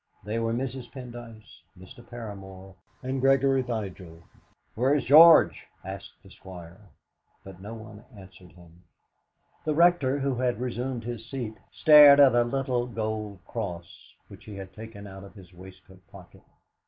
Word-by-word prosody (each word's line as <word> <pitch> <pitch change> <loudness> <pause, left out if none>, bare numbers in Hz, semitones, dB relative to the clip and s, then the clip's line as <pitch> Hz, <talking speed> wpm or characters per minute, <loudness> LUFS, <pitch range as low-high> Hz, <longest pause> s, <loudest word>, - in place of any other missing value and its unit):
They 105 +3 -3
were 115 0 -1
Mrs. 130 +1 -5
Pendyce, 120 -6 -12 0.2
Mr. 95 +6 -14
Paramor, 95 -5 -10 0.3
and 130 +1 -3
Gregory 135 0 +3
Vigil. 95 -8 -7 0.5
"Where's 135 +4 0
George?" 160 +4 +6 0.2
asked 95 0 -9
the 95 - -17
Squire, 95 +2 -13 0.5
but 95 -1 -13
no 105 +3 -8
one 110 -1 -12
answered 95 -2 -16
him. 85 -1 -19 0.8
The 155 -1 -2
Rector, 170 -5 +3
who 140 -1 -1
had 125 -2 -2
resumed 125 0 -4
his 115 -1 -8
seat, 120 -5 -5 0.2
stared 150 -2 +7
at 140 -3 +6
a 120 0 +3
little 125 -1 -2
gold 110 -4 -5
cross 95 -5 -8
which - - -15
he 105 - -10
had 95 -1 -10
taken 110 -1 -11
out 95 -1 -11
of 100 - -15
his 95 -3 -16
waistcoat 95 +1 -16
pocket. 90 -3 -16
110 Hz, 145 wpm, -26 LUFS, 95-130 Hz, 0.8 s, stared